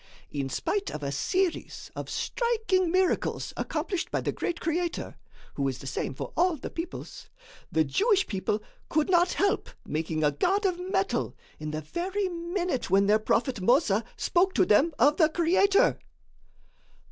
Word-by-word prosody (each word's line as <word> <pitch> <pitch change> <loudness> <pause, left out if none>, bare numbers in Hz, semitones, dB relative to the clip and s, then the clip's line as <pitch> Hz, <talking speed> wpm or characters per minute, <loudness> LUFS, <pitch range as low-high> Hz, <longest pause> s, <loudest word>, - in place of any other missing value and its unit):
In 140 -2 -2
spite 400 - -1
of 150 - -6
a 140 - -2
series 360 - -1
of - - -5
striking 440 -7 0
miracles 370 0 0
accomplished 345 +4 -2
by - - -1
the - - -1
great 345 - -3
Creator, 340 +1 -2 0.4
who 140 -1 -1
is 130 -2 -2
the 135 - -11
same 135 0 -3
for - - -6
all 350 0 +3
the 265 - -7
peoples, 335 +1 -7 0.4
the 160 - +3
Jewish 395 - +2
people 205 +1 -2 0.3
could 310 +4 +1
not 350 0 +4
help 400 +1 +1 0.2
making 155 0 -2
a 150 - +4
god 390 - +1
of 360 -2 +1
metal 380 +2 -1 0.2
in 155 0 -4
the 155 +1 -3
very 370 - -2
minute 345 -4 -2
when 195 +2 +4
their 210 +2 +4
prophet 230 +1 0
Mossa 230 - +3
spoke 370 +2 +2
to - - +4
them 270 +11 +4
of 290 +5 +4
the 315 -3 +5
Creator! 390 +7 +3
335 Hz, 160 wpm, -28 LUFS, -, 0.4 s, the